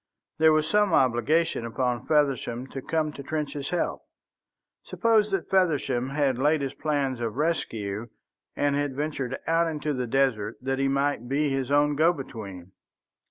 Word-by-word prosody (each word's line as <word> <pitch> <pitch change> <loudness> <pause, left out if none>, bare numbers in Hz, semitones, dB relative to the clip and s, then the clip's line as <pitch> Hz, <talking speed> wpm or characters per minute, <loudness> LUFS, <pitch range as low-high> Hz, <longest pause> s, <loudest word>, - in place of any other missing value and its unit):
There 160 0 +6
was 155 0 +2
some 210 -3 +2
obligation 135 +4 +2
upon 120 +1 -2
Feversham 135 -5 +1
to 135 - -6
come 155 +1 -1
to 140 - -8
Trench's 145 -1 -3
help. 175 - -1 0.8
Suppose 220 -3 +2
that 195 -4 -2
Feversham 145 -9 +1
had 135 -3 0
laid 150 +2 +2
his 135 -1 -3
plans 140 -4 -1
of 115 -2 -3
rescue, 115 -9 -2 0.5
and 145 -1 +1
had 145 -2 -1
ventured 135 -3 -3
out 165 +1 +2
into 150 -2 -2
the 125 -2 -2
desert 115 -5 +1
that 135 +1 -2
he 135 - +2
might 140 -3 0
be 145 +1 +1
his 135 -1 -1
own 145 +1 +3
go 165 +4 +4
between. 100 - -8
140 Hz, 160 wpm, -26 LUFS, 125-155 Hz, 0.8 s, There